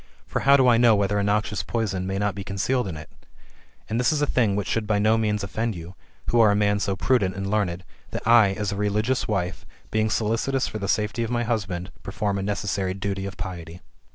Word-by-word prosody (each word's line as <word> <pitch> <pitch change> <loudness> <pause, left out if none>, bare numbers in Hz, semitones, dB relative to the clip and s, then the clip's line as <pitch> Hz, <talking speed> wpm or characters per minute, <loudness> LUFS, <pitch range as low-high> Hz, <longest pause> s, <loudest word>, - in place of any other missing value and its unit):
For - - -2
how 140 0 +5
do 130 -2 +4
I 120 -2 +6
know 120 -2 +6
whether 100 0 +1
a - - +1
noxious 105 -1 0
poison 95 +1 -2
may 95 0 -2
not 105 0 0
be 100 +1 -6
concealed 105 +5 -1
in 85 -4 -5
it? 75 - -9 0.8
And 110 +2 -1
this 125 - +3
is 155 - 0
a 145 - +2
thing 115 -8 +1
which 100 -1 -2
should 110 -2 -1
by 105 -1 +2
no 110 +2 +3
means 105 -2 0
offend 110 +2 -2
you, 85 +2 -9 0.4
who 120 - +3
are 110 -2 +6
a 100 - +3
man 105 0 +2
so 100 -1 -1
prudent 95 -3 +1
and 100 0 -3
learned, 95 -4 -1 0.3
that - - -6
I, 115 -4 +6
as 105 0 -2
a - - -3
religious 105 +5 0
wife, 95 -3 -2 0.3
being 110 0 +1
solicitous 115 +5 0
for 110 - -5
the 100 - -3
safety 105 +3 0
of 115 - -2
my 120 -1 0
husband, 95 -6 -3
perform 100 0 -2
a - - -2
necessary 100 -1 -2
duty 100 0 -3
of 95 - -9
piety.'' 85 -2 -7
105 Hz, 235 wpm, -24 LUFS, 95-110 Hz, 0.8 s, I